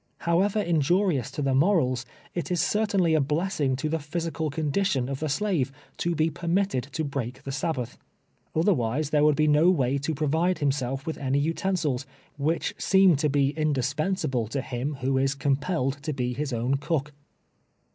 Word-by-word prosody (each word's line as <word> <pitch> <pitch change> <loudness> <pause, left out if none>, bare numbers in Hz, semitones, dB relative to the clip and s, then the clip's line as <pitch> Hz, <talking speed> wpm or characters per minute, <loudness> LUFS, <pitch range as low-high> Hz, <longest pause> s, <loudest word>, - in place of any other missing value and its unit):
However 190 +5 +2
injurious 170 - +1
to 145 +2 -4
the 135 -1 +1
morals, 130 -5 +2 0.3
it 175 - -3
is 180 -1 0
certainly 195 -2 +2
a 155 - +4
blessing 150 -2 0
to 135 +4 -2
the 160 +1 -1
physical 160 +1 -3
condition 150 -2 0
of 135 0 -4
the 155 - -2
slave, 160 -5 0 0.3
to 170 0 -1
be 160 +1 +1
permitted 170 -1 0
to 160 - -1
break 135 -3 -4
the 135 - -5
Sabbath. 135 -4 -3 0.6
Otherwise 155 - +1
there 150 -1 +3
would 150 -1 +5
be 155 +1 +2
no 150 +4 +5
way 140 -6 +2
to 150 +3 -2
provide 160 +5 +1
him 145 -2 +2
self 135 0 -3
with 160 - -4
any 135 0 0
utensils, 155 -3 -1 0.3
which 155 +4 -1
seem 190 -3 +5
to 150 +2 +1
be 140 0 +2
indispensa 155 +4 0
ble 120 -4 0
to 135 +5 -2
him 135 +4 -3
who 130 +1 +1
is 135 0 +1
compelled 140 0 -1
to 150 +1 -3
be 125 -2 -2
his 145 +2 -3
own 120 +3 0
cook. 150 0 -2
150 Hz, 175 wpm, -26 LUFS, 135-170 Hz, 0.6 s, would